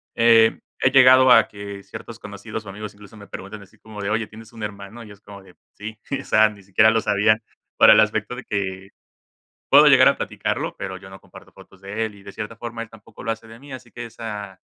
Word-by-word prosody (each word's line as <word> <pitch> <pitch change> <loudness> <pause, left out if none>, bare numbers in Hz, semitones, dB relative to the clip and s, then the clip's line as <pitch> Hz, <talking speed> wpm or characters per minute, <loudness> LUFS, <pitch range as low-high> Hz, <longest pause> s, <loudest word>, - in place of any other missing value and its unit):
eh, 115 -1 +4 0.2
he 130 - +3
llegado 130 -1 +7
a - - +6
que 100 -1 -9
ciertos 115 0 -11
conocidos, 105 +1 -8
o 100 - -9
amigos, 105 +1 -8
incluso, 105 +1 -16
me 100 -1 -13
preguntan 100 +3 -9
así 100 - -19
como 110 -2 -11
de: 100 - -3
"Oye, 110 0 -1
¿tienes 110 +1 -14
un 115 -2 -12
hermano?". 105 +2 -8
Y 105 - -13
es 100 0 -16
como 100 -1 -13
de: 95 - -19 0.2
"Sí". 110 +1 -8 0.2
O - - -10
sea, 110 0 +4
ni 100 -2 -14
siquiera 100 +3 +3
lo 115 - +2
sabían, 110 +1 +2 0.4
para - - +8
el - - +6
aspecto 125 - -1
de 125 - -9
que, 95 -1 -4 0.8
puedo - - +7
llegar - - +7
a - - +4
platicarlo, - - -3
pero 95 -1 -6
yo 95 0 -14
no 95 -1 -12
comparto - - -17
fotos 95 -1 -18
de 105 +3 -3
él. 110 - -7
Y 100 - -16
de 100 - -11
cierta 105 +3 -7
forma, 115 0 -7
él 110 - -14
tampoco 110 0 -15
lo 115 - -1
hace 115 0 -7
de 115 +1 -13
mí. 140 -1 -12
Así 125 -2 -11
que 120 -1 -8
esa 105 -4 -8
105 Hz, 240 wpm, -22 LUFS, 100-115 Hz, 0.8 s, para